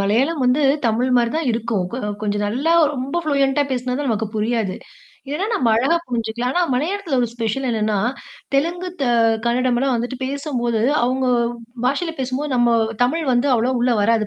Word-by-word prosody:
மலையாளம் 260 +9 +1
வந்து 250 +4 +3 0.2
தமிழ் 230 +3 +1
மாரி 235 -1 +2
தான் 320 -2 -1
இருக்கும். 225 -4 -1
கொ - - -3 0.2
கொஞ்சம் 205 -1 -1
நல்லா 265 +10 0 0.2
ரொம்ப 275 +6 -2
ப்ளூயன்ட்டா 280 -1 +2
பேசுனா 250 0 -1
தான் 290 - -2
நமக்கு 220 -1 0
புரியாது. 215 -3 -1 0.5
இல்லேன்னா 300 +9 -2
நாம 240 - +2
அழகா 270 +9 +2
புரிஞ்சுக்கலாம். 235 0 -2
ஆனா 355 - +2
மலையாளத்தில 325 +1 -1
ஒரு 240 - +1
ஸ்பெஷல் 235 +3 -2
என்னன்னா, 215 -2 0 0.6
தெலுங்கு 340 +6 0
த, - - +1 0.4
கன்னடம் 245 +1 +1
எல்லாம் 265 0 +1
வந்துட்டு 245 +3 -3
பேசம்போது, 260 -5 -2 0.2
அவங்க 255 +2 +1 0.6
பாஷையில 325 +6 0
பேசும்போது 260 +2 -2
நம்ம 240 -1 +3 0.3
தமிழ் 315 +6 0
வந்து 245 +3 +2
அவ்வளவா 245 +2 +1
உள்ளே 245 0 +2
வராது 220 0 +2
250 Hz, 165 wpm, -20 LUFS, 230-280 Hz, 0.6 s, வந்து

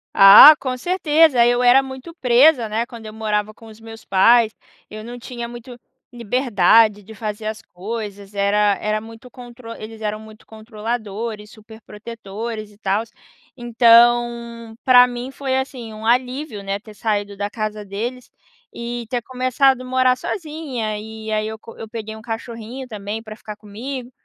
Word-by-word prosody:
Ah, 200 +10 +10
com 255 -2 -3
certeza. 310 -5 +3
Eu 245 +1 +2
era 250 +2 +5
muito 265 +5 -9
presa, 255 -3 +4
né, 225 +3 -2
quando 230 -2 -12
eu 215 - -8
morava 215 -1 -2
com 225 +1 -16
os 220 0 -14
meus 225 0 -12
pais. 220 +4 +4 0.3
Eu 215 0 -9
não 240 +2 -9
tinha 240 -1 -7
muito 240 +1 -11 0.3
liberdade 225 -3 +2
de 220 +3 -12
fazer 215 0 -6
as 220 0 -4
coisas, 205 +1 -7
era 205 0 +2
era 215 0 -1
muito 225 +3 -13
contro 245 -2 -12
eles 220 +1 -10
eram 215 0 -3
muito 215 0 -14
controladores, 220 -1 -6
superprotetores 220 0 -9
e 205 - -21
tals. 205 +3 -2 0.4
Então, 235 -1 +3
pra 250 -1 +7
mim 245 +1 -6
foi 270 -1 -3
assim 255 -4 -4
um 220 +1 -7
alívio, 250 -2 -1
né, 195 +1 -3
ter 215 -1 -15
saído 205 -2 -2
da 205 - -2
casa 215 -1 -5
deles, 235 +6 -6 0.4
e 235 0 -5
ter 245 0 -2
começado 255 +1 +1
morar 255 0 +2
sozinha. 290 - -4
E 220 0 -8
aí 215 0 -1
eu 220 0 -7
co 230 - -14
eu 225 - -8
peguei 220 -1 -7
um 220 - -11
cachorrinho 230 +2 -7
também 210 0 -6
pra 215 -1 -10
ficar 210 -1 -9
comigo. 240 +5 -8
225 Hz, 160 wpm, -20 LUFS, 215-245 Hz, 0.4 s, Ah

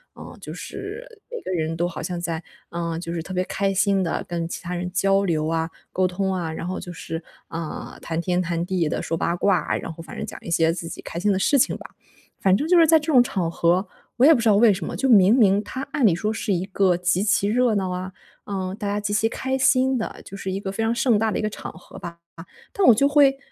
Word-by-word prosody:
嗯， - - -11
就 - - -7
是 430 +5 -7 0.3
每 485 - -4
个 - - -4
人 165 -2 -1
都 175 +1 +1
好 170 -2 -6
像 175 +1 -3
在 170 -1 -3 0.3
呃， 170 -1 -3
就 170 -1 -5
是 165 -2 -3
特 185 - -7
别 185 - +1
开 195 +1 -1
心 195 -1 +2
地 165 - -1
跟 170 -1 -2
其 - - -5
他 180 0 -4
人 180 +1 -4
交 195 +2 +2
流 155 -5 0
啊， 165 0 -1 0.2
沟 185 - +2
通 190 +1 -1
啊， 175 -3 -2
然 165 +2 -5
后 185 - -3
就 175 - -7
是， 165 -1 -6 0.2
呃， 165 -1 -6
谈 165 0 -3
天 180 +1 0
谈 170 -1 -2
地 180 -4 0
地 - - -2
说 165 - -2
八 170 +1 0
卦， 195 +1 +1
然 165 - -6
后 165 +1 -10
反 160 - -10
正 - - -3
讲 - - -8
一 - - -7
些 165 0 +3
自 165 -1 -6
己 - - -8
开 - - -7
心 205 +3 +2
的 190 - +1
事 280 - +3
情 255 - +2
吧。 - - -12 0.5
反 190 0 +4
正 295 +7 -2
就 360 - +5
是 330 - +7
在 320 0 +5
这 300 - -8
种 250 -2 +7
场 185 -8 -2
合， 175 +3 +1 0.3
我 255 - +5
也 320 - +9
不 250 - +1
知 230 - +3
道 205 - +5
为 220 -1 +6
什 180 -4 -5
么， - - -5
就 270 - 0
明 205 -4 +6
明 205 -4 +4
它 260 +5 -5
按 275 - +2
理 195 - +5
说 210 +6 -1
是 220 - -3
一 180 0 -1
个 190 -2 +2
极 180 +1 +1
其 200 -1 +2
热 235 +1 +2
闹 190 -2 0
啊， 180 +1 -4 0.3
呃， 190 -2 -4
大 205 - -3
家 205 +1 -1
极 205 0 -2
其 220 +2 +2
开 265 +3 -2
心 260 0 +3
的， 225 - -5
就 - - -9
是 190 -1 -4
一 190 - -2
个 195 - -5
非 200 +3 -2
常 225 +1 +1
盛 235 -1 +2
大 220 +1 +1
的 - - -1
一 - - -1
个 215 - 0
场 - - -7
合 160 - -14
吧。 170 0 -8 0.2
啊， - - -16 0.3
但 400 -2 +2
我 - - +9
就 275 +6 +3
会 285 -2 +5
190 Hz, 295 characters per minute, -23 LUFS, 170-220 Hz, 0.5 s, 也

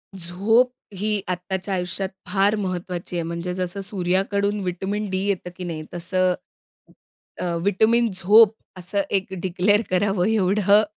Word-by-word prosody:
झोप 200 +8 +2 0.2
ही 210 +1 0
आत्ताच्या 185 +2 -3
आयुष्यात 180 +1 -2 0.2
फार 195 +3 +2
महत्त्वाची 180 -3 -4
आहे. 170 - -1
म्हणजे 170 +2 -4
जसं 180 +1 -3
सूर्याकडून 195 +2 0
विटामिन 195 +3 -3
डी 190 - -1
येतं, 190 -3 -1
की 185 - -6
नाही 165 -3 -4
तसं, 185 +1 +1 1.1
अ, - - -2 0.2
विटामिन 225 +4 +3
झोप 210 +4 +6 0.2
असं 185 +3 -1
एक 190 -1 +1 0.2
डिक्लेअर 190 +3 +2
करावं 185 0 +1
एवढं 205 0 +4
190 Hz, 130 wpm, -23 LUFS, 180-205 Hz, 1.1 s, झोप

